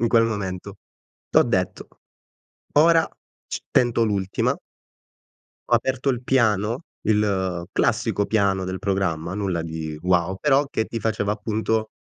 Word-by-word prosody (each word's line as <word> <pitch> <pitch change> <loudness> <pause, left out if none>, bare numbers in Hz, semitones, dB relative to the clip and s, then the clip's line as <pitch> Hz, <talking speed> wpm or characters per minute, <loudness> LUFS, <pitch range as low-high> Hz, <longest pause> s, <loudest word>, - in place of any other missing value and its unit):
in 115 - +2
quel 115 0 +5
momento? 100 -2 -4 0.5
T'ho - - +6
detto: - - -1 0.9
"Ora 165 +1 +5 0.4
c - - -4
tento 120 -1 +3
l'ultima". 100 -3 0 1.1
Ho - - +4
aperto 130 +1 0
il 125 -2 -2
piano, 115 - +1 0.2
il 95 -5 +1
classico 110 -3 +1
piano 100 -3 +1
del 95 0 -4
programma, 95 -5 -1
nulla 95 -4 -1
di 80 -1 -5
wow, 90 +1 +2
però 145 +1 +3
che 110 - 0
ti 115 - -5
faceva, 105 -1 0
appunto, 110 +1 -1
105 Hz, 130 wpm, -23 LUFS, 95-115 Hz, 1.1 s, T'ho